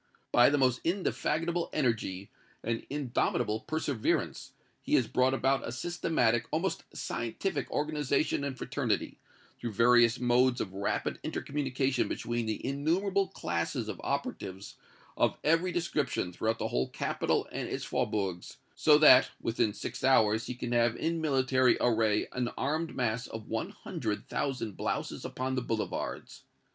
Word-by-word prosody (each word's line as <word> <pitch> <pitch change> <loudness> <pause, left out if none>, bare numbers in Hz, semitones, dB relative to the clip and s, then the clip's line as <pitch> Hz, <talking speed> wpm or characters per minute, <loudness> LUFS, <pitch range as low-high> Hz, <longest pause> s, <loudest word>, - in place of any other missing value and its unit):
By 120 +2 +6
most 130 -3 +2
indefatigable 170 -1 0
energy 110 -8 -1 0.3
and 115 0 -3
indomitable 125 -5 0
perseverance, 140 -3 -2 0.3
he - - +1
has - - +4
brought 130 +1 +2
about 135 0 +1
a - - -4
systematic, 120 -5 0
almost - - -1
scientific 140 - -3
organization 150 -1 0
and 140 -2 -3
fraternity, 125 -5 -2 0.4
through 120 -2 -4
various 120 +2 +5
modes 125 +1 +3
of 95 - -3
rapid 100 +1 -2
intercommunication 135 -2 -1
between 120 -1 -2
the 110 - -3
innumerable 180 +9 +1
classes 85 - -2
of - - -6
operatives 95 +1 -4 0.4
of - - +2
every 165 +4 +3
description 150 - -1
throughout 110 +5 -1
the - - -2
whole 65 +1 0
capital - - -1
and - - -4
its - - -3
faubourgs, 95 -4 -2 0.2
so 150 -1 +6
that, 150 -4 +8
within 115 -1 0
six 105 - -6
hours, 110 -4 +4
he 125 - -4
can 120 -1 -5
have 120 -1 +3
in 165 +3 -1
military 130 -4 +3
array 110 -3 +2
an 125 -1 -1
armed 155 +4 -1
mass 120 -1 -1
of 110 -1 -8
one - - -2
hundred 105 -1 -4
thousand 130 -6 -2
blouses - - -3
upon 130 +1 -3
the 130 - 0
boulevards. 115 -2 -4
125 Hz, 140 wpm, -30 LUFS, 115-145 Hz, 0.4 s, that